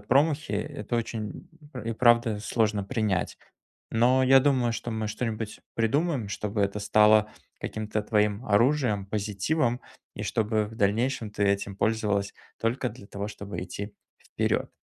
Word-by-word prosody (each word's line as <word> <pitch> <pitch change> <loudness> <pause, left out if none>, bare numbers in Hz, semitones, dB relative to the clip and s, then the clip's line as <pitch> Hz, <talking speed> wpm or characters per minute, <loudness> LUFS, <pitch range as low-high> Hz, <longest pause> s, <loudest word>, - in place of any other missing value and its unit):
промахи, 140 +4 +2
э, 105 +1 -1
это 110 +3 -2
очень, 110 -2 -4 0.3
пр 125 -4 -7
и 115 - 0
правда, 120 -2 +4
сложно 110 -2 0
принять. 105 -4 -1 0.5
Но 125 +3 +4
я 135 +1 +7
думаю, 130 -4 +2
что 120 - -4
мы 110 -1 -2
что-нибудь 110 0 -4
придумаем, 130 - +1
чтобы 105 0 -3
это 100 +1 0
стало 105 +1 +5 0.3
каким-то 110 0 -3
твоим 105 +1 +1
оружием, 115 -2 +2
позитивом. 110 +6 0 0.3
И - - -5
чтобы 110 -1 0
в 110 - -11
дальнейшем 115 +2 +1
ты 100 0 -1
этим 100 0 0
пользовалась 105 -2 0 0.3
только 120 +2 0
для 100 - -13
того, 100 0 -5
чтобы 100 -3 -6
идти 100 +3 -6 0.3
вперед. - - -1
110 Hz, 145 wpm, -27 LUFS, 105-120 Hz, 0.5 s, я